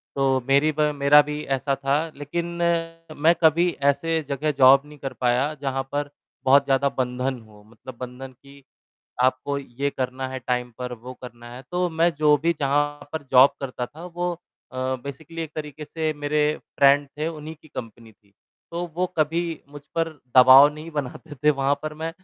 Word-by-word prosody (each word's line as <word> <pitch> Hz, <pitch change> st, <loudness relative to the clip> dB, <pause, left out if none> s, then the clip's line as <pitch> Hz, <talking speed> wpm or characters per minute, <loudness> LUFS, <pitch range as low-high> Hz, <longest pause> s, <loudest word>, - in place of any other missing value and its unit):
तो 135 Hz, -1 st, +2 dB
मेरी 140 Hz, +3 st, +4 dB
ब 150 Hz, -1 st, +2 dB
मेरा 140 Hz, +1 st, +6 dB
भी 150 Hz, +1 st, -5 dB
ऐसा 135 Hz, +1 st, -1 dB
था 135 Hz, +1 st, 0 dB, 0.2 s
लेकिन 145 Hz, +4 st, -4 dB, 0.7 s
मैं 160 Hz, +3 st, +5 dB
कभी 165 Hz, +3 st, +4 dB, 0.2 s
ऐसे 160 Hz, +3 st, 0 dB
जगह 150 Hz, +2 st, 0 dB
जॉब 135 Hz, +1 st, +7 dB
नहीं 150 Hz, 0 st, -14 dB
कर 135 Hz, -1 st, -5 dB
पाया 125 Hz, +4 st, +1 dB
जहाँ 135 Hz, -1 st, -2 dB
पर, 145 Hz, 0 st, -2 dB, 0.4 s
बहुत 140 Hz, +2 st, +5 dB
ज़्यादा 135 Hz, +1 st, +2 dB
बंधन 125 Hz, 0 st, -2 dB
हो 105 Hz, -1 st, -18 dB
मतलब 115 Hz, +2 st, -12 dB
बंधन 125 Hz, +1 st, -8 dB
कि 140 Hz, 0 st, -17 dB, 0.6 s
आपको 130 Hz, +2 st, +1 dB
ये 140 Hz, +1 st, -3 dB
करना 130 Hz, 0 st, -3 dB
है, 130 Hz, 0 st, -5 dB
टाइम 125 Hz, 0 st, -2 dB
पर 125 Hz, -1 st, -4 dB
वो 125 Hz, +2 st, -9 dB
करना 120 Hz, -1 st, -10 dB
है। 130 Hz, -, -9 dB
तो 180 Hz, 0 st, 0 dB
मैं 165 Hz, +1 st, +2 dB
जो 150 Hz, 0 st, +4 dB
भी 170 Hz, -, +3 dB
जहाँ 145 Hz, +1 st, 0 dB
पर 160 Hz, -, -3 dB
जॉब 130 Hz, +1 st, +7 dB
करता 130 Hz, -2 st, -4 dB
था 160 Hz, +7 st, -12 dB
वो 175 Hz, 0 st, -3 dB, 0.4 s
अ, 130 Hz, -, -9 dB, 0.3 s
बेसिकली 155 Hz, +4 st, -7 dB
एक 160 Hz, -, -6 dB
तरीके 150 Hz, 0 st, -6 dB
से 155 Hz, 0 st, -2 dB
मेरे 145 Hz, +1 st, -1 dB, 0.4 s
फ्रेंड 140 Hz, +1 st, +5 dB
थे, 155 Hz, +2 st, -1 dB
उन्हीं 155 Hz, -1 st, -7 dB
की -, -, -17 dB
कंपनी 115 Hz, -4 st, -9 dB
थी। 100 Hz, -1 st, -32 dB, 0.4 s
तो 170 Hz, +1 st, -3 dB
वो 180 Hz, -, +1 dB
कभी 160 Hz, +2 st, +1 dB, 0.3 s
मुझ 145 Hz, -1 st, -10 dB
पर 165 Hz, 0 st, +1 dB, 0.3 s
दबाव 130 Hz, +3 st, +9 dB
नहीं 155 Hz, +2 st, -9 dB
बनाते 145 Hz, +1 st, -6 dB
थे 150 Hz, -, +6 dB
वहाँ 140 Hz, 0 st, +1 dB
पर 155 Hz, 0 st, -4 dB
मैं 160 Hz, +1 st, -4 dB
140 Hz, 185 wpm, -24 LUFS, 130-155 Hz, 0.7 s, दबाव